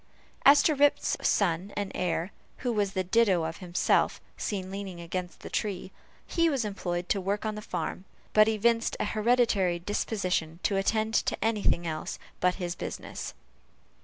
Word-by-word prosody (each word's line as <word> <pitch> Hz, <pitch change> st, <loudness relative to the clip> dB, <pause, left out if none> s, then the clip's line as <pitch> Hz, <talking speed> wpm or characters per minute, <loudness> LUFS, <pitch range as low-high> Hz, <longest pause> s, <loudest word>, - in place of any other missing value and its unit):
As 285 Hz, +1 st, +8 dB
to 310 Hz, -, +4 dB
Rip's 290 Hz, 0 st, +3 dB
son 190 Hz, 0 st, +1 dB
and 205 Hz, -1 st, -2 dB
heir, 180 Hz, +1 st, -1 dB, 0.3 s
who 245 Hz, -, +2 dB
was 205 Hz, -3 st, 0 dB
the 190 Hz, -, 0 dB
ditto 190 Hz, -3 st, +3 dB
of 160 Hz, 0 st, -3 dB
himself, 175 Hz, -2 st, +1 dB, 0.2 s
seen 190 Hz, -3 st, -3 dB
leaning 195 Hz, -3 st, -6 dB
against 175 Hz, +1 st, -5 dB
the -, -, -8 dB
tree, 190 Hz, -3 st, -2 dB, 0.3 s
he 335 Hz, -1 st, +2 dB
was 270 Hz, -7 st, 0 dB
employed 180 Hz, -3 st, -3 dB
to 200 Hz, -, +1 dB
work 200 Hz, +3 st, -1 dB
on 215 Hz, -, -1 dB
the 210 Hz, -, -6 dB
farm; 190 Hz, -2 st, -4 dB, 0.3 s
but 215 Hz, 0 st, +7 dB
evinced 230 Hz, +1 st, +2 dB
an -, -, +1 dB
hereditary 215 Hz, -5 st, +2 dB
disposition 180 Hz, -3 st, -1 dB
to 200 Hz, -, +1 dB
attend 215 Hz, +3 st, +1 dB
to -, -, +1 dB
any 225 Hz, -2 st, +1 dB
thing 175 Hz, -3 st, +1 dB
else 155 Hz, -1 st, -3 dB, 0.2 s
but 180 Hz, 0 st, +2 dB
his 175 Hz, -2 st, -3 dB
business. -, -, -6 dB
195 Hz, 165 wpm, -29 LUFS, 180-220 Hz, 0.3 s, As